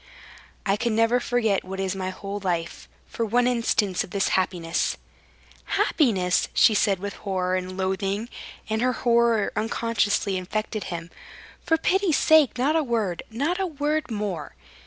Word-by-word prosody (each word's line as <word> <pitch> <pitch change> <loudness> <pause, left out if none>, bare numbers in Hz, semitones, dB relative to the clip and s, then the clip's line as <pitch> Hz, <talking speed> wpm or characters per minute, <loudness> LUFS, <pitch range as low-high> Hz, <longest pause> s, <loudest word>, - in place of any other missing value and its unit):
"I 200 0 +2
can 235 0 0
never 230 +2 +3
forget 230 -5 0
what 190 +1 -7
is 190 0 -1
my 185 -1 -3
whole 200 +2 -6
life. 175 -4 -3 0.2
For 230 - -4
one 240 +3 +2
instant 230 -6 +1
of - - -11
this 195 +1 0
happiness...." 175 -3 0 0.8
"Happiness!" 190 - +2
she 220 - +6
said 200 -1 +2
with 200 +2 -6
horror 185 -2 -1
and 185 0 -4
loathing 195 +3 -1 0.4
and 220 +1 -1
her 255 +1 +2
horror 235 -3 +2
unconsciously 215 -3 0
infected 215 +3 -3
him. 170 -1 -6 0.5
"For 325 - +2
pity's 360 -1 +2
sake, 310 -5 +4
not 280 +6 +2
a 325 - +3
word, 225 - -1
not 285 - -1
a 385 - 0
word 300 -1 -1
more." 205 -9 -4
215 Hz, 155 wpm, -25 LUFS, 190-245 Hz, 0.8 s, she